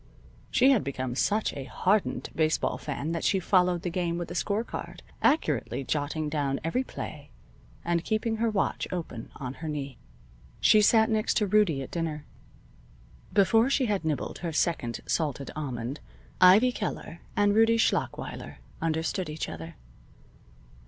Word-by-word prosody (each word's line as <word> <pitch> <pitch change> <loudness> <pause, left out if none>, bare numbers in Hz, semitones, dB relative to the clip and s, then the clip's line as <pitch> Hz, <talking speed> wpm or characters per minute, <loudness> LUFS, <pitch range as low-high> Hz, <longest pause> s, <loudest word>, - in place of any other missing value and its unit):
She 260 +3 +5
had 250 -7 +3
become 130 -2 -3
such 210 - +1
a 135 - -6
hardened 190 +9 0
baseball 155 -1 +1
fan 150 +1 -4
that 165 -1 -2
she 195 - +2
followed 180 -1 +2
the 175 - -2
game 170 -1 -1
with 175 - -5
a - - -3
score 205 +4 0
card, - - -7 0.2
accurately 150 - +1
jotting 150 +2 -2
down 145 -2 -1
every 165 +11 0
play, 145 - -8 0.6
and 170 -1 +1
keeping 220 +2 -1
her 230 +1 +1
watch 205 -3 -1
open 160 -10 -5
on 130 -2 -5
her 160 - -3
knee. 140 -4 -5 0.6
She 215 - +6
sat 220 +1 +5
next 215 0 +1
to 210 - +3
Rudie 190 -9 +2
at - - -10
dinner. 160 -3 -3 1.1
Before 225 +5 +4
she 275 -1 +2
had 205 -5 0
nibbled 155 -3 -2
her 170 -2 -3
second 150 -8 -1
salted 145 -4 -1
almond, 130 -3 -4 0.4
Ivy 205 +8 +7
Keller 190 -7 -5
and 205 0 +3
Rudie 225 +1 +5
Schlachweiler 225 - -1 0.3
understood 165 +2 -1
each 155 +1 -4
other. 80 0 -8
170 Hz, 150 wpm, -28 LUFS, 145-210 Hz, 1.1 s, Ivy